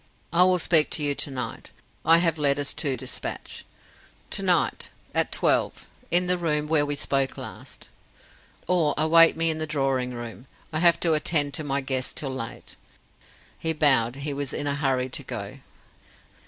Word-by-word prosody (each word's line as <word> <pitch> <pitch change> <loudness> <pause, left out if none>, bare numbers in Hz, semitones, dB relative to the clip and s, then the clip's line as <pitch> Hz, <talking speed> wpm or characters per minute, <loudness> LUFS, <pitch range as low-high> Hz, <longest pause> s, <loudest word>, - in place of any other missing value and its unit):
I 175 +2 +5
will 185 0 +5
speak 165 -3 +4
to 155 - 0
you 145 -1 +2
to 140 - -2
night. 125 -4 -6 0.3
I 165 +1 +6
have 165 -2 0
letters 145 -1 +2
to 140 -5 -1
dispatch. - - -5 0.7
To - - +2
night: - - +2 0.2
at - - +1
twelve: - - 0 0.2
in 180 +1 +3
the 180 0 +1
room 150 -3 0
where 150 -2 +2
we 145 - -1
spoke 135 -1 0
last. - - -9 0.8
Or 165 -5 +1
await 165 +2 +6
me 165 0 +2
in 155 - -4
the 155 - -2
drawing 135 -4 -1
room. 120 +2 -9 0.3
I 155 - 0
have 170 0 +4
to 165 -2 +2
attend 150 -2 0
to 155 - -2
my 140 -1 -1
guests 130 -1 -1
till 135 -3 -4
late." 115 -3 -7 0.8
He 160 0 -1
bowed; 135 -6 +3
he 145 - -3
was 140 -1 -4
in 145 - -3
a 145 - 0
hurry 135 -3 -1
to - - -3
go. - - -7
145 Hz, 175 wpm, -25 LUFS, 135-160 Hz, 0.8 s, I